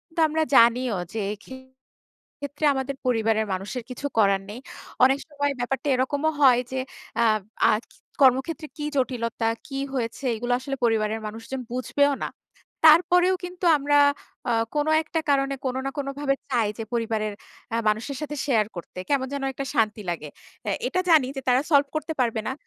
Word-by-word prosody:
তো - - -2
আমরা 315 +1 0
জানিও 235 -1 +5 0.2
যে, 225 - -2 0.2
ক্ষেত্রে 260 0 -14 0.8
আমাদের 265 +1 -3
পরিবারের 225 -3 +2
মানুষের 205 +6 -4
কিছু 250 +3 -7
করার 195 -2 +4
নেই। 225 +4 -7 0.4
অনেক 265 +2 +6
সময় 285 -1 -1
ব্যাপারটা 265 +3 -2
এরকমও 285 +5 0
হয় 250 -3 +7
যে, 260 - -2 0.4
আ - - +5 0.5
আজ 215 - -1 0.4
কর্মক্ষেত্রে 275 +5 +3
কি 295 - -4
জটিলতা, 230 -3 -1 0.2
কি 270 -2 -5 0.2
হয়েছে, 240 +1 -3
এগুলো 245 +2 -1
আসলে 275 +1 -4
পরিবারের 220 -1 +1
মানুষজন 225 +5 -6
বুঝবেও 285 +3 +1
না। - - -2 0.6
তারপরেও 360 +3 +6
কিন্তু 360 0 -6
আমরা 290 +1 +2 0.5
আ - - +2 0.2
কোন 295 +1 +1 0.2
একটা 325 +1 -2
কারণে 275 0 +2
কোন 255 0 -1
না - - 0
কোন 275 -1 -2
ভাবে 275 -1 +1
চাই 235 -4 +2
যে, 225 - -4
পরিবারের 220 -2 -1 0.4
আ - - +1
মানুষের 235 +6 -2
সাথে 295 0 -4
শেয়ার 225 -7 +2
করতে। 175 +1 -8
কেমন 265 -2 +1
যেন 280 -1 -3
একটা 275 - -4
শান্তি 215 -2 +1
লাগে। 155 -3 -4 0.4
এ্যা 205 - 0
এটা 365 +7 -1
জানি 305 -6 +6
যে, - - -2
তারা 250 +1 +4
সলভ 285 -1 +5
করতে 315 +1 -2
পারবে 230 -3 +1
না। 260 - -1
260 Hz, 165 wpm, -25 LUFS, 225-285 Hz, 0.8 s, হয়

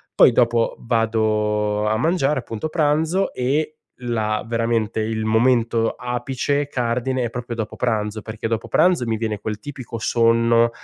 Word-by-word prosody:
Poi - - +7
dopo 115 -1 +2
vado 105 -2 0
a 110 +1 +1
mangiare, 150 -2 +1
appunto, 115 +3 -5
pranzo 160 +4 +1
e 145 +5 0 0.3
la 110 -3 -1
veramente 115 -1 0
il 110 0 -2
momento 115 0 +2
apice, 130 +3 -2
cardine, 125 0 -1
è 120 - -1
proprio 120 -1 -5
dopo 110 -2 -4
pranzo 110 -3 -1
perché 110 0 -5
dopo 115 -1 -2
pranzo 170 -5 +3
mi 110 -1 0
viene 110 -2 -3
quel 105 +1 -4
tipico 130 -2 -7
sonno, 115 +1 +3
115 Hz, 145 wpm, -21 LUFS, 110-130 Hz, 0.3 s, Poi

